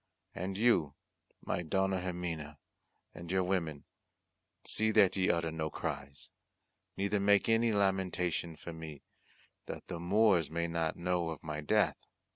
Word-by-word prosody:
And 95 +2 -4
you, 100 -11 +3 0.5
my - - -1
Dona 95 +3 +1
Ximena, 85 -5 -4 0.6
and 85 - -9
your 95 0 +2
women, 85 -6 -1 0.8
see 110 0 +2
that 100 -4 +5
ye 95 -1 +2
utter 85 -1 +1
no 80 -1 -2
cries, 70 -3 -5 0.7
neither 100 +1 +1
make 100 0 +4
any 115 0 +3
lamentation 95 -4 0
for 80 +2 -8
me, 80 -3 -8 0.6
that - - -6
the 90 -2 -4
Moors 95 -2 +3
may 85 +1 -1
not 85 -1 -1
know 90 -1 0
of 80 -3 -6
my 75 -1 -4
death. 75 - +2
85 Hz, 140 wpm, -33 LUFS, 80-95 Hz, 0.8 s, that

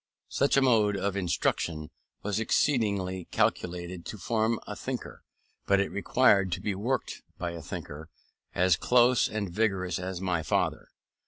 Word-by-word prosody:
Such 140 0 +2
a 135 - +5
mode 110 -5 +3
of 100 0 -1
instruction 85 -4 -1 0.3
was 105 +1 -1
excellently 100 - +1
calculated 90 0 -1
to 110 - -6
form 110 +3 0
a - - -6
thinker; - - -6 0.5
but 100 0 +4
it 100 - 0
required 100 -2 +3
to 90 - -2
be 100 +1 -2
worked 120 +8 -2 0.2
by 85 -1 -3
a 85 -1 -7
thinker, 75 +2 -7 0.5
as 90 -1 +4
close 125 0 +4
and 105 -4 -3
vigorous 95 -4 0
as 90 0 -4
my 90 -3 -1
father. - - -1
100 Hz, 150 wpm, -28 LUFS, 90-110 Hz, 0.5 s, a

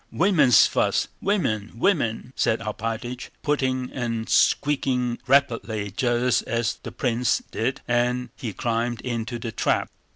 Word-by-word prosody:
Women's 170 - +5
fuss! - - +1
Women, 125 - 0
women!" 125 - 0
said 110 - +1
Alpátych, 115 +3 -4
puffing 130 -3 0
and 115 -3 -3
speaking 125 -4 +2
rapidly 115 -6 +1
just 120 +2 +1
as 115 -1 -1
the - - -7
prince 120 -1 0
did, 130 +4 -2
and 125 +1 +1
he 115 - -5
climbed 115 +2 -2
into 120 -1 -3
the 115 -1 -5
trap. - - 0
120 Hz, 125 wpm, -24 LUFS, 115-130 Hz, -, Women's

